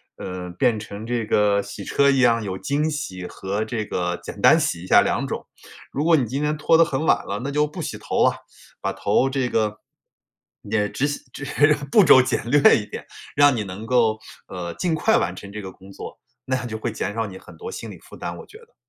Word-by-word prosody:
呃， 90 Hz, -1 st, -6 dB
变 120 Hz, -4 st, +2 dB
成 105 Hz, +1 st, -8 dB
这 120 Hz, -2 st, -1 dB
个 105 Hz, -1 st, +2 dB
洗 100 Hz, 0 st, -8 dB
车 140 Hz, +7 st, +3 dB
一 135 Hz, -1 st, +3 dB
样， 115 Hz, -3 st, +4 dB
有 95 Hz, -3 st, -4 dB
精 145 Hz, +8 st, -1 dB
洗 95 Hz, -12 st, -5 dB
和 100 Hz, +4 st, -3 dB
这 110 Hz, -1 st, -3 dB
个 90 Hz, -3 st, -2 dB
简 -, -, -8 dB
单 -, -, +7 dB
洗 85 Hz, -, -1 dB
一 95 Hz, -, -9 dB
下 -, -, +7 dB
两 -, -, 0 dB
种。 -, -, -5 dB, 0.4 s
如 145 Hz, -, -2 dB
果 165 Hz, +1 st, +5 dB
你 135 Hz, -5 st, +2 dB
今 135 Hz, +6 st, -3 dB
天 150 Hz, +1 st, 0 dB
拖 155 Hz, +2 st, +3 dB
得 165 Hz, -, +6 dB
很 145 Hz, -1 st, -2 dB
晚 -, -, +3 dB
了， 100 Hz, +1 st, -3 dB
那 140 Hz, -, -2 dB
就 150 Hz, +1 st, +2 dB
不 150 Hz, -, -7 dB
洗 -, -, -4 dB
头 -, -, 0 dB
了。 -, -, +5 dB, 0.5 s
把 -, -, -2 dB
头 130 Hz, -, +1 dB
这 135 Hz, -2 st, -1 dB
个 105 Hz, -1 st, 0 dB, 0.8 s
也 105 Hz, 0 st, 0 dB
只 135 Hz, +7 st, -1 dB
洗 145 Hz, -, -4 dB
只 140 Hz, -, -7 dB, 0.5 s
步 210 Hz, -4 st, +6 dB
骤 130 Hz, -, +8 dB
简 125 Hz, -2 st, -2 dB
略 145 Hz, 0 st, +6 dB
一 105 Hz, -, -4 dB
点， -, -, -8 dB, 0.3 s
让 145 Hz, -2 st, +5 dB
你 110 Hz, -, -1 dB
能 100 Hz, +3 st, -8 dB
够， 115 Hz, -3 st, +2 dB, 0.3 s
呃， 85 Hz, -2 st, -6 dB
尽 175 Hz, -3 st, -1 dB
快 220 Hz, +8 st, +3 dB
完 -, -, -1 dB
成 100 Hz, -, -10 dB
这 105 Hz, 0 st, -7 dB
个 95 Hz, -, -7 dB
工 95 Hz, +1 st, -15 dB
作， -, -, -9 dB, 0.3 s
那 130 Hz, -, 0 dB
样 125 Hz, -, -5 dB
就 110 Hz, -2 st, -5 dB
会 115 Hz, +2 st, -3 dB
减 105 Hz, -1 st, -4 dB
少 115 Hz, 0 st, -1 dB
你 95 Hz, -2 st, -9 dB
很 -, -, -15 dB
多 455 Hz, +1 st, -7 dB
心 -, -, -7 dB
理 -, -, -9 dB
负 -, -, -15 dB
担 -, -, -6 dB
我 -, -, -10 dB
觉 435 Hz, -, -15 dB
得。 470 Hz, +1 st, -21 dB
115 Hz, 255 characters per minute, -23 LUFS, 100-145 Hz, 0.8 s, 骤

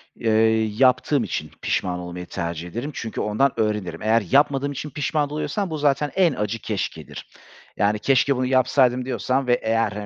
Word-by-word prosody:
Eee, 110 Hz, -1 st, +2 dB
yaptığım 130 Hz, +2 st, +3 dB
için -, -, -4 dB
pişman 90 Hz, -1 st, -1 dB
olmayı 90 Hz, 0 st, -7 dB
tercih 85 Hz, -2 st, -5 dB
ederim 120 Hz, -, -5 dB
çünkü 115 Hz, -3 st, -5 dB
ondan 110 Hz, +6 st, +2 dB
öğrenirim. 105 Hz, -4 st, -1 dB
Eğer 110 Hz, +2 st, +3 dB
yapmadığım 140 Hz, 0 st, +3 dB
için 145 Hz, +2 st, -5 dB
pişman 150 Hz, +1 st, -1 dB
oluyorsam 185 Hz, +6 st, -2 dB
bu 160 Hz, -, -3 dB
zaten 145 Hz, 0 st, +1 dB
en 180 Hz, -5 st, +3 dB
acı 105 Hz, 0 st, -3 dB
keşkedir. 105 Hz, -4 st, -5 dB, 0.5 s
Yani, 105 Hz, +1 st, +1 dB
"Keşke 135 Hz, +3 st, +2 dB
bunu 130 Hz, 0 st, -1 dB
yapsaydım." 130 Hz, -1 st, +2 dB
diyorsan 130 Hz, 0 st, -1 dB
ve 120 Hz, -, +4 dB
eğer 110 Hz, -3 st, 0 dB
125 Hz, 160 wpm, -23 LUFS, 105-140 Hz, 0.5 s, ve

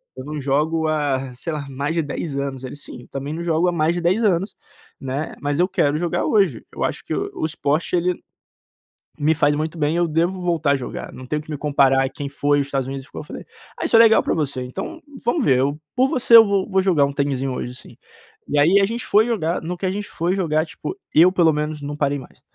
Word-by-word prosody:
Eu 130 Hz, -, -8 dB
não 150 Hz, +1 st, -5 dB
jogo 155 Hz, +4 st, +1 dB
há 140 Hz, -4 st, -1 dB
sei 160 Hz, +7 st, -5 dB
lá 150 Hz, -2 st, -4 dB
mais 140 Hz, +4 st, -3 dB
de 165 Hz, -, +2 dB
10 145 Hz, -1 st, -4 dB
anos." 135 Hz, -2 st, -4 dB
ele: 130 Hz, -, -6 dB
"Sim, 145 Hz, -3 st, -11 dB
eu -, -, -17 dB
também 140 Hz, +2 st, -5 dB
não 170 Hz, +2 st, -4 dB
jogo 170 Hz, +1 st, +1 dB
há -, -, +3 dB
mais 165 Hz, 0 st, +1 dB
de 175 Hz, -, -2 dB
10 185 Hz, +7 st, +2 dB
anos, 195 Hz, -1 st, +1 dB, 0.4 s
né? 135 Hz, +3 st, -4 dB
Mas 145 Hz, +1 st, -1 dB
eu 180 Hz, -, +4 dB
quero 150 Hz, -5 st, +1 dB
jogar 170 Hz, +1 st, -1 dB
hoje, 195 Hz, -, +2 dB
eu -, -, -3 dB
acho -, -, -2 dB
que -, -, -2 dB
o -, -, -3 dB
o -, -, -2 dB
esporte 155 Hz, +2 st, -1 dB
ele, 180 Hz, 0 st, 0 dB, 1.0 s
me 155 Hz, +2 st, +2 dB
faz 145 Hz, -1 st, +3 dB
muito 155 Hz, +2 st, -3 dB
bem 150 Hz, +1 st, 0 dB
eu 175 Hz, 0 st, +2 dB
devo 170 Hz, +4 st, 0 dB
voltar 165 Hz, -4 st, +1 dB
a -, -, +4 dB
jogar, 130 Hz, -3 st, -6 dB
não 130 Hz, -, -10 dB
tenho 150 Hz, +3 st, -2 dB
que 155 Hz, -, -11 dB
me 150 Hz, -, -3 dB
comparar 135 Hz, -2 st, +3 dB
quem 145 Hz, -, -6 dB
foi 145 Hz, +1 st, +1 dB
e -, -, +3 dB
os 140 Hz, -, -4 dB
Estados 135 Hz, -2 st, -2 dB
Unidos 135 Hz, 0 st, -6 dB
ficou." -, -, -9 dB
eu -, -, -12 dB
falei: -, -, -9 dB, 0.3 s
"Ah -, -, -3 dB
isso -, -, +2 dB
é -, -, +8 dB
legal 225 Hz, -1 st, +6 dB
pra -, -, 0 dB
você, 140 Hz, -5 st, -2 dB
então 320 Hz, -, -6 dB, 0.2 s
vamos 245 Hz, +5 st, +1 dB
ver, 130 Hz, -2 st, +4 dB
eu 140 Hz, +3 st, 0 dB, 0.2 s
por 260 Hz, +1 st, +4 dB
você 250 Hz, -3 st, +4 dB
eu 225 Hz, -, +10 dB
vou 200 Hz, -2 st, 0 dB
vou 190 Hz, -1 st, +2 dB
jogar 150 Hz, -7 st, +2 dB
tenizinho 135 Hz, -2 st, -1 dB
hoje 125 Hz, 0 st, -5 dB
sim." -, -, -13 dB, 0.5 s
E 145 Hz, -, +1 dB
aí 170 Hz, +7 st, +5 dB
a -, -, +4 dB
gente 230 Hz, +3 st, -4 dB
foi 215 Hz, +2 st, +4 dB
jogar, 175 Hz, -8 st, -1 dB
no 175 Hz, +2 st, -4 dB
que 190 Hz, -, -4 dB
a 185 Hz, -, +1 dB
gente 205 Hz, +1 st, -4 dB
foi 175 Hz, +3 st, -1 dB
jogar, 155 Hz, -4 st, +1 dB
tipo, 370 Hz, -, -7 dB, 0.2 s
eu 175 Hz, +4 st, +7 dB
pelo 170 Hz, -4 st, +3 dB
menos 150 Hz, 0 st, -3 dB
não 145 Hz, +1 st, -5 dB
parei 145 Hz, -1 st, 0 dB
mais, 130 Hz, -, -15 dB
155 Hz, 255 wpm, -21 LUFS, 140-175 Hz, 1.0 s, eu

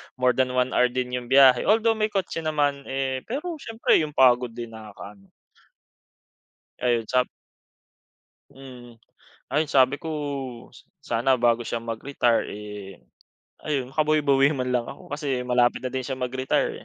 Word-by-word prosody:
more 125 Hz, -1 st, +3 dB
than 125 Hz, 0 st, 0 dB
1 125 Hz, 0 st, +1 dB
hour 125 Hz, -, +3 dB
din 125 Hz, 0 st, -3 dB
’yung 125 Hz, -1 st, -4 dB
biyahe, 130 Hz, -1 st, +6 dB
although 225 Hz, +1 st, +4 dB
may 215 Hz, 0 st, +1 dB
kotse 195 Hz, -5 st, -3 dB
naman, 145 Hz, -3 st, -1 dB
eh, 135 Hz, -1 st, -2 dB
pero 305 Hz, +6 st, -4 dB
siyempre 225 Hz, -6 st, +1 dB
’yung 150 Hz, -2 st, -3 dB
pagod 125 Hz, -2 st, +4 dB
din 120 Hz, -1 st, -7 dB
nakakaano. 105 Hz, -2 st, -12 dB, 1.5 s
Ayon 120 Hz, -2 st, +1 dB
sap 125 Hz, 0 st, +2 dB, 1.2 s
Hmm, 125 Hz, -3 st, -13 dB, 0.5 s
ayun, 150 Hz, +2 st, +1 dB
sabi 130 Hz, +1 st, +4 dB
ko 160 Hz, -, -7 dB, 0.9 s
sana 125 Hz, 0 st, +1 dB
bago 120 Hz, 0 st, +2 dB
siya 115 Hz, -, -3 dB
mag-retire, 115 Hz, +1 st, 0 dB
eh, 105 Hz, -4 st, -9 dB, 0.6 s
ayun, 135 Hz, -4 st, -3 dB
makabwi-bawi 150 Hz, -2 st, +3 dB
man 125 Hz, 0 st, -2 dB
lang 120 Hz, -1 st, 0 dB
ako -, -, -10 dB
kasi 135 Hz, -4 st, -2 dB
malapit 125 Hz, -1 st, +2 dB
na 130 Hz, -, -4 dB
din 130 Hz, -, -1 dB
siya 130 Hz, 0 st, -4 dB
mag 125 Hz, 0 st, -4 dB
retire, 130 Hz, 0 st, 0 dB
130 Hz, 145 wpm, -24 LUFS, 120-145 Hz, 1.5 s, biyahe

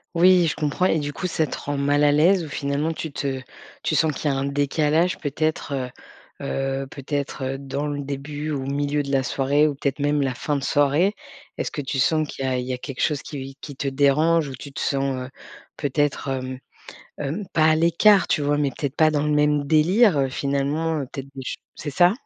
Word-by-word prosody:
Oui, 180 Hz, 0 st, +6 dB
je -, -, -1 dB
comprends 155 Hz, +4 st, 0 dB
et 160 Hz, -, +3 dB
du 145 Hz, 0 st, -3 dB
coup 180 Hz, +5 st, -3 dB
ça 160 Hz, -2 st, 0 dB
te -, -, -5 dB
rend 145 Hz, 0 st, -3 dB
mal 145 Hz, +1 st, +2 dB
à 145 Hz, -, +5 dB
l'aise 170 Hz, +4 st, +4 dB
ou -, -, -8 dB
finalement 145 Hz, +3 st, -1 dB
tu 160 Hz, -1 st, -5 dB
te 135 Hz, -2 st, -3 dB, 0.4 s
tu -, -, 0 dB
sens 155 Hz, -2 st, +3 dB
qu'il 145 Hz, +1 st, -1 dB
y -, -, 0 dB
a 135 Hz, -, -1 dB
un 135 Hz, -, -1 dB
décalage 150 Hz, +4 st, +1 dB
peut-être, 155 Hz, -1 st, -2 dB
heu, 130 Hz, -2 st, -3 dB, 0.9 s
heu, 135 Hz, -, -9 dB
peut-être, 140 Hz, 0 st, -4 dB
heu, 135 Hz, +1 st, -2 dB
dans 140 Hz, +2 st, -3 dB
le 145 Hz, -1 st, -3 dB
début 145 Hz, +2 st, -5 dB
ou 140 Hz, -, -2 dB
le 140 Hz, -, -2 dB
milieu 145 Hz, 0 st, 0 dB
de 140 Hz, -, -5 dB
la 135 Hz, -1 st, +3 dB
soirée, 140 Hz, +3 st, +2 dB
ou 145 Hz, -, -2 dB
peut-être 140 Hz, +1 st, -2 dB
même 145 Hz, 0 st, +1 dB
la 135 Hz, -2 st, 0 dB
fin 145 Hz, +4 st, -2 dB
de 140 Hz, -, -2 dB
soirée? 145 Hz, +9 st, +3 dB, 0.4 s
Est-ce -, -, -2 dB
que 145 Hz, -, -3 dB
tu 135 Hz, 0 st, -3 dB
sens, 155 Hz, +3 st, +3 dB
qu'il 135 Hz, -, -5 dB
y -, -, 0 dB
a 130 Hz, -1 st, 0 dB
il 125 Hz, -, -3 dB
y 130 Hz, -, -3 dB
a -, -, -3 dB
quelque 135 Hz, 0 st, -6 dB
chose 150 Hz, -3 st, +1 dB
qui 135 Hz, -2 st, -7 dB
qui 145 Hz, -, -9 dB
te 140 Hz, +1 st, -3 dB
dérange, 150 Hz, +4 st, +3 dB
ou 135 Hz, -, -6 dB
tu 140 Hz, +3 st, -10 dB
te -, -, -7 dB
sens, 135 Hz, -2 st, -1 dB
heu, 125 Hz, -, -10 dB, 0.5 s
peut-être, 145 Hz, 0 st, -1 dB
hem, 130 Hz, -1 st, -3 dB, 0.6 s
hem, 150 Hz, +8 st, -3 dB
pas 155 Hz, -, +4 dB
à 155 Hz, 0 st, +5 dB
l'écart 170 Hz, +5 st, +4 dB
tu 150 Hz, -, +1 dB
vois, 145 Hz, 0 st, +1 dB
mais 145 Hz, -2 st, +1 dB
peut-être 140 Hz, +2 st, -4 dB
pas 155 Hz, -1 st, +5 dB
dans 150 Hz, -1 st, 0 dB
le 150 Hz, -, +1 dB
même 150 Hz, -1 st, +2 dB
délire, 170 Hz, +5 st, +4 dB
heu, 135 Hz, -1 st, +2 dB
finalement, 140 Hz, +4 st, -1 dB
heu, 135 Hz, -, -4 dB
peut-être 135 Hz, 0 st, -7 dB
des 135 Hz, -, -7 dB
ch 125 Hz, -, -4 dB, 0.2 s
c'est 145 Hz, -, -5 dB
ça? 175 Hz, +6 st, +5 dB
145 Hz, 235 wpm, -23 LUFS, 135-155 Hz, 0.9 s, Oui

